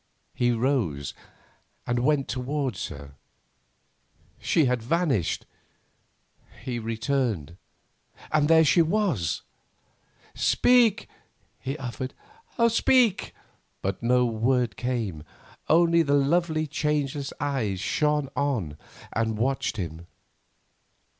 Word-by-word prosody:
He 120 - +1
rose 115 - -1 0.7
and 120 0 0
went 140 +2 +1
towards 130 -3 -2
her. 70 0 -10 1.3
She 160 - +2
had 125 -2 +1
vanished. 130 - 0 1.2
He 120 -2 -3
returned, 115 - -2 0.8
and 150 -1 +3
there 160 0 +6
she 170 +4 +5
was. 165 - 0 0.9
"Speak!" 245 -4 +3 0.5
he 135 +2 -4
muttered; 130 -1 -5 0.5
"speak!" 230 -2 +2 0.5
But 95 0 -2
no 125 +1 +3
word 120 -1 0
came, 115 -10 -3 0.5
only 170 +1 +5
the 145 -3 +2
lovely 155 +2 +1
changeless 145 -2 -2
eyes 125 -10 -1
shone 150 +6 0
on 115 - -1 0.3
and 110 -1 -1
watched 130 +1 -1
him. 85 -3 -6
130 Hz, 95 wpm, -26 LUFS, 110-150 Hz, 1.3 s, there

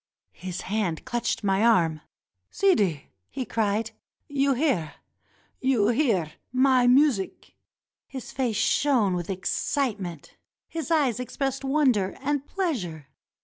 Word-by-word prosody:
His 180 -1 -6
hand 190 -6 -2
clutched 240 -2 -2
my 195 +1 +2
arm. 170 -9 +3 0.5
"Sidi!" 205 - +1 0.2
he 260 - -4
cried. 220 0 -1 0.4
"You 280 -1 +1
hear! 245 - 0 0.6
You 245 -6 +2
hear! 225 - +1 0.2
My 255 -1 +4
mu 280 +4 +6
sic!" 195 -6 -7 0.5
His 260 -3 -8
face 250 -5 -1
shone 245 -10 +2
with 175 0 -3
excitement; 195 - -2 0.3
his 325 0 -5
eyes 285 -8 +2
expressed 270 +2 -3
wonder 265 -9 +2
and 285 +1 -2
pleasure. 185 - -3
235 Hz, 115 wpm, -26 LUFS, 190-275 Hz, 0.6 s, mu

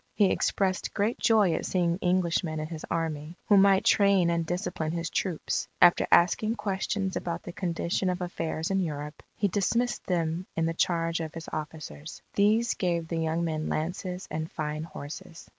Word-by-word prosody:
He 205 -3 +4
expressed 190 -2 0
great 215 +3 0
joy 215 -7 +4
at - - -2
seeing 175 -1 +1
Englishmen 175 -3 +1
in 155 - -3
his 160 0 -7
army, 165 0 -3
who 205 - +7
might 195 -1 +5
train 195 -4 +4
and 170 0 +1
discipline 165 -2 -2
his 170 0 -3
troops. 180 -5 -1
After 175 - +6
asking 215 +6 +4
questions 195 -2 -2
about 170 -1 -3
the - - -7
condition 175 +1 -1
of 180 0 -1
affairs 165 -1 -3
in 195 - +2
Europe, 150 -4 -4 0.2
he 205 - +2
dismissed 230 +6 0
them 170 0 -1
in 165 - +1
the 165 - 0
charge 165 -1 0
of 160 -1 -5
his 165 0 -7
officers. 155 0 -6
These 215 +3 +3
gave 170 -3 -1
the 165 - -2
young 160 +1 0
men 155 -2 -2
lances 180 +3 -3
and 155 +1 -3
fine 150 0 -3
horses. 155 +1 -9
170 Hz, 175 wpm, -28 LUFS, 160-190 Hz, 0.2 s, who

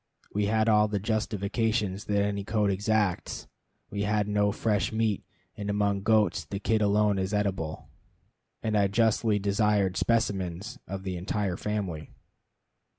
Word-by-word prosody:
We 105 0 +1
had 110 +1 +2
all 105 -1 +5
the 105 -1 -1
justification 110 0 0
that 100 +3 -9
any 100 -1 -1
code 105 -1 +1
exacts. 105 -1 0 0.5
We 100 - -2
had 105 0 +1
no 105 0 +2
fresh 105 -1 0
meat, 110 -2 0 0.3
and 105 0 -5
among 100 -1 +1
goats 105 -5 +2
the 100 - -5
kid 110 +1 +1
alone 105 -1 +3
is 95 +2 -1
eatable; 95 -6 -2 0.8
and 110 -1 0
I 100 -1 +4
justly 110 +1 +2
desired 100 -1 +1
specimens 105 0 -1
of 95 0 -5
the 95 -2 -3
entire 95 +1 -1
family. 95 -7 -3
105 Hz, 145 wpm, -28 LUFS, 100-110 Hz, 0.8 s, all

